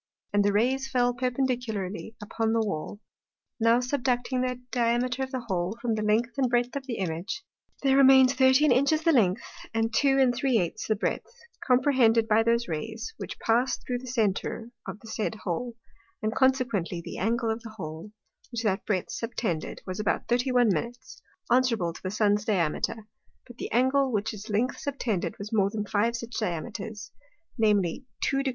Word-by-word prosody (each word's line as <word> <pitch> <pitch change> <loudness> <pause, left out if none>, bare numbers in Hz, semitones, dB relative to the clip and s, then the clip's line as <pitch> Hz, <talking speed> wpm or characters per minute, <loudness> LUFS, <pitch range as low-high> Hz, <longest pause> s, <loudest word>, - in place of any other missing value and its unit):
And 205 0 +4
the 205 - +3
Rays 260 +6 +1
fell 245 -2 +2
perpendicularly 240 -5 -2
upon 220 +1 -1
the 230 - +2
Wall. 195 +2 -4 0.6
Now 230 +1 +5
subducting 250 0 0
the 250 -1 -2
Diameter 245 +1 +1
of 265 - -2
the 260 -1 -3
Hole 190 -2 -2
from 235 -1 -1
the 215 - -1
length 230 +5 +1
and 260 -2 +2
breadth 245 +1 +1
of 275 -1 -4
the 240 - -2
Image, 175 +2 -3 0.4
there 270 -1 +4
remains 265 -1 +7
13 260 +2 +5
Inches 280 +5 +3
the 330 - +4
length, 200 - +3 0.3
and 225 0 +1
2⅜ 260 - +2
the 215 - +2
breadth, 205 - -2 0.3
comprehended 250 -4 +4
by 220 +1 +4
those 235 +1 +1
Rays, 220 - -5
which - - -6
passed 240 +3 +1
thro' 245 -1 -2
the 255 - -10
Center 225 0 -1 0.2
of 210 - -6
the 225 - -13
said 220 0 -2
Hole, 230 +7 -3 0.5
and 215 0 0
consequently 255 -9 +1
the 175 - -6
Angle 230 +3 0
of 220 +1 -4
the 220 -1 -10
Hole, 160 +3 -7 0.4
which 235 -1 -3
that 200 -2 0
breadth 190 -4 -1
subtended, 225 -8 -3
was 185 +1 -5
about 210 - -1
31', 240 - +2 0.6
answerable 235 -9 +2
to - - -12
the 185 - -3
Sun's 205 0 +2
Diameter; 210 +2 -1 0.4
but 245 -2 -14
the - - -5
Angle, 260 +3 +3
which 210 -1 -1
its 210 +1 -9
length 225 +6 0
subtended, 245 -9 -2
was 205 +2 -7
more 200 -3 +3
than 210 0 -3
five 215 +3 +1
such 235 0 -6
Diameters, 210 +3 -4 0.5
namely 210 +2 +1 0.2
2° - - +2
49'. 275 0 0
230 Hz, 170 wpm, -27 LUFS, 210-255 Hz, 0.6 s, remains